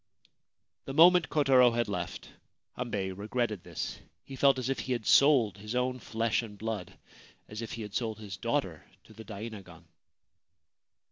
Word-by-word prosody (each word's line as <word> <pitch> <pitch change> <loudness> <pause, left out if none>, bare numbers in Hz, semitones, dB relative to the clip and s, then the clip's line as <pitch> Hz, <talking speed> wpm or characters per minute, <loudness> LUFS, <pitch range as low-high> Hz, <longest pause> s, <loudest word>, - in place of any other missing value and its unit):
The 135 - -6
moment 175 +1 +6
Kotaro 130 -5 +4
had 120 -1 0
left, 90 -4 -5 0.5
Hambei 105 -6 -3
regretted 105 0 -2
this. - - -5 0.2
He 135 - -9
felt 135 0 +4
as 130 -1 -3
if 135 -1 -1
he 130 - -2
had 120 -3 -4
sold 130 -9 +5
his 105 +4 -6
own 125 0 0
flesh 115 0 -1
and 105 -3 -10
blood 110 -3 -5 0.3
— - - -27
as 105 +1 -7
if 115 - -6
he 115 - -5
had 105 -1 -9
sold 110 -3 -2
his 105 -3 -7
daughter - - -2
— - - -40
to - - -17
the 110 +1 -11
dainagon. 100 -5 -9
115 Hz, 175 wpm, -30 LUFS, 105-130 Hz, 0.5 s, moment